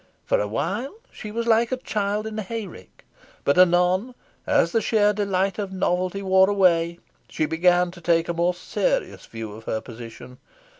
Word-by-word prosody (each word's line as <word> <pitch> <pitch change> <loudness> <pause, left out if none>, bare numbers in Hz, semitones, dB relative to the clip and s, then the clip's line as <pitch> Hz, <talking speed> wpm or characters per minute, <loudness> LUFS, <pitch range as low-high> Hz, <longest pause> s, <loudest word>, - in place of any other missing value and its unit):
For - - +2
a 105 - -1
while, 205 - -3 0.2
she 215 - -8
was 230 +2 -3
like 230 +1 +3
a 255 - 0
child 210 -3 -2
in 220 0 -5
a - - -1
hay 225 +2 -5
rick. 185 - -14 0.4
But 140 +5 +2
anon, 185 +6 +3 0.3
as 170 - +3
the 225 - +1
sheer 210 -2 +2
delight 195 -1 -1
of 200 -2 -3
novelty 185 +1 -1
wore 190 0 +4
away, 170 -4 +2 0.3
she 155 - -1
began 175 +3 +2
to 175 -1 -14
take 165 0 +2
a 170 - -1
more 170 +1 +1
serious - - -2
view 115 -2 -7
of 110 +2 -11
her 110 - -2
position. 120 +2 -11
185 Hz, 185 wpm, -23 LUFS, 170-210 Hz, 0.4 s, wore